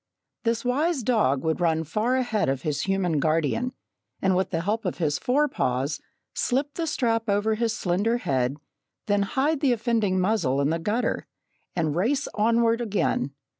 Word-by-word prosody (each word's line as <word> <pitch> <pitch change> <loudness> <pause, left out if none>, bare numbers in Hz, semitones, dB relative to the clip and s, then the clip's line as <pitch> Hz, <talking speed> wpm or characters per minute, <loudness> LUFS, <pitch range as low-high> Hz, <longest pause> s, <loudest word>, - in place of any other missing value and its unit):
This 230 +1 0
wise 280 +3 +1
dog 210 - +2
would 160 +2 0
run 160 -2 +2
far 215 - 0
ahead 225 - 0
of 135 -1 -2
his 150 -2 -1
human 190 -5 +1
guardian, 160 - +1 0.5
and 190 -1 +2
with 190 +1 +1
the 165 -2 -1
help 210 +5 -1
of 180 - -3
his 150 -4 0
forepaws 150 - 0 0.3
slip 275 +3 0
the 335 -1 -3
strap 230 -6 0
over 205 +2 +2
his 230 +1 -1
slender 200 +6 +1
head, 135 - -1 0.5
then 205 -1 +2
hide 270 +9 0
the 275 -4 +3
offending 225 -5 +1
muzzle 180 -9 +1
in 140 +2 +2
the 165 - 0
gutter, 210 +8 -1 0.5
and 160 -4 0
race 235 +11 +1
onward 230 +2 +2
again. 195 - -1
210 Hz, 165 wpm, -25 LUFS, 160-240 Hz, 0.5 s, the